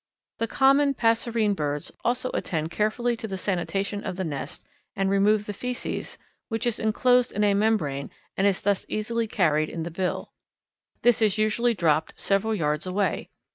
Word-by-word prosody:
The 230 - 0
common 275 +3 +4
passerine 225 -2 +2
birds 145 -3 -3
also 245 +1 0
attend 160 -1 -2
carefully 235 +4 0
to 225 - -5
the 195 -2 -4
sanitation 195 +2 -2
of 185 -3 -4
the 190 - -2
nest 145 -2 -5 0.3
and 195 0 0
remove 205 +1 +3
the 205 - -4
feces, 250 +4 -4 0.3
which 225 +1 -2
is 240 -2 0
inclosed 245 +3 +3
in 210 - 0
a 205 -1 +4
membrane 200 -10 0 0.3
and 195 - +3
is 195 -2 +1
thus 200 -1 +1
easily 230 +2 -1
carried 155 -7 +2
in 165 - -4
the 170 - -5
bill. 180 +2 -2 0.7
This 240 -1 +4
is 215 -2 +3
usually 225 +2 +2
dropped 160 -4 +1
several 205 +3 +1
yards 150 -2 -1
away. 190 -1 -1
205 Hz, 170 wpm, -26 LUFS, 180-230 Hz, 0.7 s, common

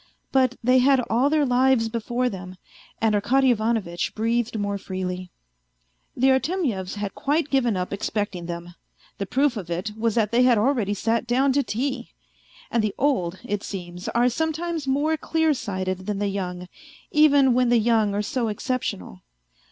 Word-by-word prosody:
But 260 -2 +3
they 255 +2 +5
had 270 +1 +4
all 250 +5 +3
their 300 -1 +2
lives 250 -2 +3
before 240 +2 -1
them, 185 -4 -6 0.4
and 225 -1 +2
Arkady 260 +6 +3
Ivanovitch 215 -6 -1
breathed 230 +1 0
more 200 -1 -2
freely. 185 -1 -5 0.9
The 265 +2 +4
Artemyevs 265 - -1
had 205 -1 -4
quite 295 +1 -1
given 245 -7 +2
up 180 +1 -3
expecting 200 -3 -3
them. 175 0 -6 0.5
The 200 - -3
proof 265 +2 +1
of 180 -5 -6
it 175 +5 -3
was 225 0 -1
that 220 -3 +1
they 240 +1 +3
had 250 -2 +5
already 215 -3 +1
sat 230 +3 0
down 260 +3 +2
to 285 - +3
tea! 255 0 -3 0.6
And 230 -2 +1
the 215 - -1
old, 190 -11 0
it 205 0 -2
seems, 180 -2 -7
are 240 +1 +2
sometimes 320 +3 -2
more 295 +4 +1
clear 320 0 +1
sighted 185 -5 -4
than 210 -1 -1
the 205 0 -1
young, 180 -2 -4 0.4
even 285 -4 +5
when 250 0 +2
the 240 - +4
young 220 -2 +2
are 205 - 0
so 240 +2 -1
exceptional. 210 - -3
230 Hz, 165 wpm, -24 LUFS, 200-265 Hz, 0.9 s, they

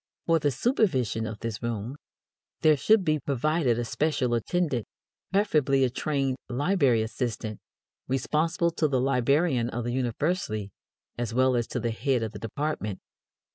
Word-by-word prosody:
For 165 -1 +3
the 145 - +2
supervision 130 - +1
of 110 -1 -7
this 115 -3 -4
room, 115 +2 -3 0.7
there 155 -1 +6
should 205 +7 +3
be 155 -1 +2
provided 140 -1 +1
a 120 - -1
special 130 0 0
attendant, 130 0 0 0.4
preferably 150 -9 +3
a 125 - +2
trained 135 -1 -1
library 135 - +2
assistant, 110 -1 -4 0.5
responsible 160 +6 +1
to 160 -1 +1
the 135 -3 +1
librarian 135 0 +2
of 120 0 -3
the 120 +1 -2
university 125 - -1 0.5
as 120 -1 -2
well 130 0 +4
as 120 -1 0
to - - -3
the 115 0 -1
head 125 +1 0
of 110 - -3
the 105 - -9
department. 115 -4 -3
130 Hz, 150 wpm, -27 LUFS, 115-155 Hz, 0.7 s, there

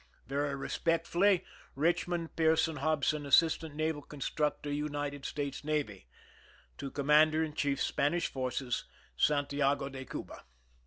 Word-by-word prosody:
Very 140 +1 -1
respectfully, 170 +6 +1 0.3
Richmond 170 +2 0
Pearson 160 -1 +2
Hobson, 150 +1 +1
Assistant 160 +1 +3
Naval 155 -1 -1
Constructor, 150 0 -2
United 145 -1 -3
States 140 -1 -4
Navy. 145 - -2 0.7
To 140 - -4
Commander 150 +3 +4
in 155 -2 -4
Chief 140 -2 0
Spanish 170 +5 +1
Forces, 130 -1 -2 0.3
Santiago 145 - +1
de 135 -1 -7
Cuba. - - -7
150 Hz, 110 wpm, -32 LUFS, 140-160 Hz, 0.7 s, Commander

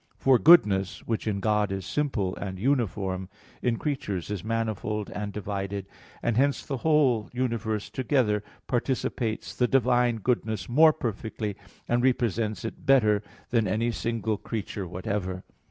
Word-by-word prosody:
For 130 -2 +4
goodness, 100 - +5
which 115 -1 -2
in 100 -2 0
God 105 -1 +1
is 95 -1 -3
simple 125 -11 -1
and 95 -2 -5
uniform, 95 -6 -1 0.3
in 120 -2 +1
creatures 105 - -3
is 100 -5 -3
manifold 110 -2 -2
and 105 0 -4
divided 100 -1 -4 0.4
and 120 -2 +1
hence 140 +2 +2
the 135 - -3
whole 135 -7 +2
universe 115 -4 -2
together 120 -5 +1 0.2
participates 120 -3 -2
the 125 - +2
divine 125 -1 +3
goodness 110 -4 -1
more 155 +6 +6
perfectly, 110 -6 -4 0.3
and 120 0 +2
represents 115 -3 0
it 110 - -6
better 110 -7 +4 0.3
than 115 -3 +2
any 115 +5 0
single 115 -1 -2
creature 100 -4 -5
whatever. 95 +1 -3
110 Hz, 140 wpm, -27 LUFS, 100-125 Hz, 0.4 s, more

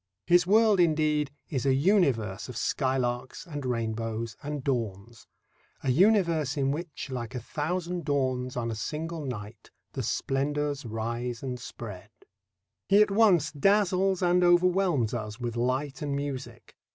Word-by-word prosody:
His 175 0 +4
world, 215 0 +5
indeed, 155 -3 +2 0.2
is 135 -6 -2
a 135 -1 +3
universe 135 - +1
of 125 - -6
skylarks 130 0 -1
and 145 -5 -6
rainbows 115 -1 -2
and 145 -2 -4
dawns 115 -4 -3 0.6
a 130 - +2
universe 170 - +3
in 135 -1 +1
which 150 -2 -5
Like 125 0 -5
a - - -2
thousand 175 +7 -3
dawns 130 -3 -1
on 115 -1 -1
a - - -3
single 155 +8 -4
night 110 -4 -7 0.2
The - - -3
splendours 145 0 -1
rise 115 +2 -3
and 125 -2 -4
spread. 105 -5 -9 0.8
He 200 +1 +6
at 210 - -3
once 190 -8 +4
dazzles 190 +2 +2
and 180 0 +3
overwhelms 175 - +3
us 110 -1 -5
with 120 -2 -3
light 130 +3 -1
and 145 -2 -2
music. 140 -2 -6
140 Hz, 140 wpm, -28 LUFS, 120-170 Hz, 0.8 s, He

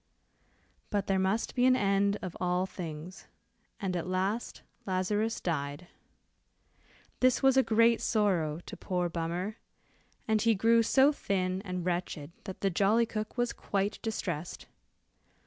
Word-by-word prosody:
But 205 -1 0
there 195 -1 +1
must 190 +4 0
be 250 0 +3
an 255 - +6
end 200 -2 +2
of 180 -2 -5
all 180 +1 +1
things, 170 -1 -8 0.5
and 190 -2 -2
at 175 0 -2
last 190 +5 -2 0.2
Lazarus 205 +4 0
died. 145 0 -3 1.3
This 255 0 +3
was 270 -1 +5
a 265 - +6
great 230 -1 +3
sorrow 175 -8 +1
to - - -8
poor 180 -2 -2
Bummer, 175 +6 -3 0.7
and 220 -1 +2
he 225 0 +4
grew 230 +3 +4
so 265 +5 +5
thin 190 -8 -1
and 180 -3 -4
wretched 175 -4 -3
that 190 -3 -7
the 195 - +1
jolly 205 +6 +3
cook 215 +1 -5
was 240 0 0
quite 200 +1 -2
distressed. 175 - -4
195 Hz, 140 wpm, -30 LUFS, 180-220 Hz, 1.3 s, an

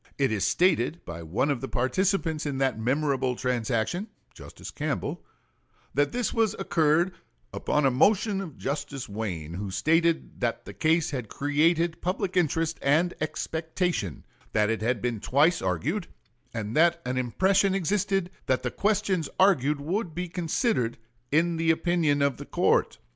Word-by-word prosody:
It 135 -3 +2
is 105 -3 +1
stated 170 -3 +1
by 85 -1 -7
one 90 - 0
of 130 -4 -2
the 135 - -3
participants 160 +4 0
in 140 -2 -2
that 130 -4 0
memorable 130 +1 0
transaction 125 - -1 0.3
(Justice - - -10
Campbell) - - -3 0.7
that 145 0 +2
this 245 -1 -1 0.2
occurred 170 -1 +2 0.4
"upon 150 -1 0
a 135 - +4
motion 200 - +3
of 190 - -5
Mr. - - -22
Justice 145 -1 -4
Wayne, 95 -7 -4
who 100 +3 -4
stated 165 - +1
that 120 -1 -1
the 100 - -8
case 160 - +1
had 125 -7 -4
created 160 +4 +1
public 185 +1 -2
interest 165 -1 +1
and 160 +6 +2
expectation, 160 - -2 0.3
that 105 +1 +2
it 115 - -2
had 115 0 0
been 120 -3 -1
twice 150 - +3
argued, 90 -3 -1 0.4
and 110 -1 -4
that 170 +2 +4
an 130 0 -1
impression 190 - +2
existed 195 0 0 0.2
that 130 -1 +1
the 125 - -1
questions 200 -6 0
argued 150 -7 +4
would 170 +3 -3
be 180 +1 -3
considered 170 - 0 0.3
in 165 +3 +2
the 165 0 +1
opinion 160 -3 +2
of 140 -2 +1
the - - -8
court." - - +2
150 Hz, 155 wpm, -27 LUFS, 125-175 Hz, 0.7 s, a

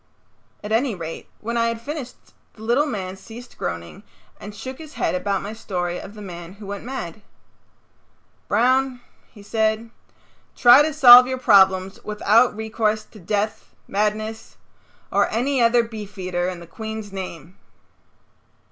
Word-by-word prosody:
At 210 - -6
any 230 0 +1
rate 165 -2 -7
when 235 +2 -3
I 230 0 +2
had 230 0 -2
finished 275 0 -6 0.4
the 220 - -13
little 245 +7 +2
man 190 -7 -4
ceased 235 +5 -12
groaning 85 - -5 0.4
and 205 0 -9
shook 260 +5 -8
his 315 0 -11
head - - 0
about 195 +2 -1
my 205 +2 -5
story 180 -5 -3
of 205 - -10
the 210 - -9
man 175 -2 -9
who 205 +1 -12
went 200 0 -6
mad. 215 -7 -6 1.3
"Broun," 255 +3 +2 0.3
he 205 - -15
said, 220 +1 -1 0.6
"try 245 +2 +8
to 310 +1 +1
solve 250 -4 +9
your 260 0 -2
problems 195 -5 +4
without 215 +3 +3
recourse 220 0 -1
to 215 - -16
death, 205 +4 -3
madness 215 +2 -2 0.5
or - - +2
any 255 +3 0
other 235 0 +4
beefeater 195 -5 -4
in 180 -2 -7
the - - -10
Queen's 220 +2 -7
name." 185 -2 -7
215 Hz, 145 wpm, -22 LUFS, 195-240 Hz, 1.3 s, solve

